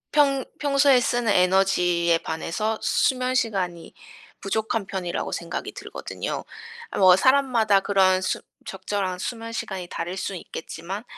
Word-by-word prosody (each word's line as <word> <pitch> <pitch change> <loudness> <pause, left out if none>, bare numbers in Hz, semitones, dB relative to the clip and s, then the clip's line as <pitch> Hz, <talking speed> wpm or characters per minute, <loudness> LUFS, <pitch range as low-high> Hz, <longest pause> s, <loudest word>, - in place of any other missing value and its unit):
평 275 -3 +3
평소에 275 -2 +4
쓰는 240 -3 +1
에너지에 180 -2 +3
반해서 190 +8 -2
수면 255 -2 +1
시간이 190 -9 -2 0.5
부족한 220 +1 -1
편이라고 185 -3 -3
생각이 170 0 -4
들거든요. - - -6 0.5
뭐 185 -2 +8
사람마다 240 -3 +3
그런 190 -1 +3
수 185 - -1 0.2
적절한 190 -1 -3
수면 230 +3 -5
시간이 190 -5 -5
다를 175 +2 -4
수 195 0 -4
있겠지만 175 +3 -7
195 Hz, 295 characters per minute, -24 LUFS, 180-235 Hz, 0.5 s, 뭐